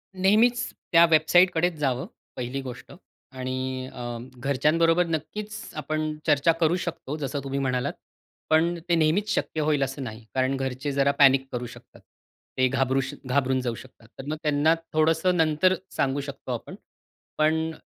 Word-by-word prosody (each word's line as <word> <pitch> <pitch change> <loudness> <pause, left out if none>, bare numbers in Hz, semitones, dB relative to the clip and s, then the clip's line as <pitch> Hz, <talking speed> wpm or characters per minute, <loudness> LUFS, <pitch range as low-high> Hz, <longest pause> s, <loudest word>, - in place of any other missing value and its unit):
नेहमीच 220 +6 +3 0.2
त्या 170 0 +7
वेबसाईटकडेच 175 +2 +4
जावं 130 -3 -1 0.3
पहिली 125 +2 -4
गोष्ट 125 -2 -9 0.4
आणि 130 0 -4
अ, 120 -1 -5 0.2
घरच्यांबरोबर 165 +6 +2
नक्कीच 210 +7 -5
आपण 155 0 -2
चर्चा 150 +2 +4
करू 160 +2 +3
शकतो, 175 -5 -4
जसं 140 -1 -3
तुम्ही 135 0 -3
म्हणालात. 125 -2 -1 0.6
पण 165 +2 +3
ते 170 - +4
नेहमीच 165 +7 +2
शक्य 155 - -1
होईल 150 -2 +2
असं 135 +1 -4
नाही, 110 -2 -8
कारण 130 +1 +1
घरचे 135 +1 -3
जरा 140 0 +2
पॅनिक 135 -1 +6
करू 125 0 -3
शकतात. - - -15 0.6
ते 130 0 +4
घाबरू 135 0 +1
श 135 +2 -5
घाबरून 130 0 +1
जाऊ 120 -2 -2
शकतात. 120 -2 -15
तर 135 - -7
मग 155 - -2
त्यांना 150 +2 +3 0.2
थोडंसं 160 +3 +2
नंतर 160 +3 +3 0.2
सांगू 140 +1 0
शकतो 140 -2 -7
आपण. 120 - -7 0.6
पण 160 +1 +2
145 Hz, 150 wpm, -25 LUFS, 130-160 Hz, 0.6 s, त्या